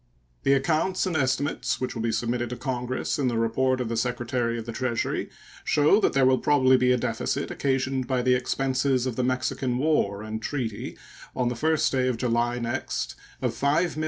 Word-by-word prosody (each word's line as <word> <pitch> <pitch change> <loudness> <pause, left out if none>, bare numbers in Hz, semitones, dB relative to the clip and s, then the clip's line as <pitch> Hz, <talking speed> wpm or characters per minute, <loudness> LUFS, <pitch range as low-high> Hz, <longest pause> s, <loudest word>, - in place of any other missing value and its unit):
The 135 - +3
accounts 160 +8 +1
and 180 -3 -2
estimates 140 0 0
which 130 - -2
will 115 - -4
be 115 0 0
submitted 120 +1 -1
to 125 - -4
Congress 125 +1 -2
in 135 - +1
the 120 -2 0
report 130 +3 +1
of 125 - -2
the 115 - -2
Secretary 120 0 -1
of 115 - -5
the 115 - -5
Treasury 120 0 -2 0.3
show 150 +7 +4
that 210 - +2
there 135 -1 +4
will 130 0 +4
probably 130 -3 +4
be 125 0 +3
a 125 - +4
deficit - - -2
occasioned 130 -1 -1
by 130 -2 0
the 125 0 +4
expenses 130 +1 +1
of 130 -3 -2
the 125 - 0
Mexican 130 0 -1
War 125 -9 +1
and 110 0 -5
treaty 115 -5 -4 0.4
on 125 -1 +1
the 120 - -3
1st 155 +5 +1
day 130 -1 +1
of 125 -2 0
July 120 0 0
next 120 +2 -3 0.3
of - - +1
$5,828,121. 155 +3 0
130 Hz, 195 wpm, -26 LUFS, 120-135 Hz, 0.4 s, show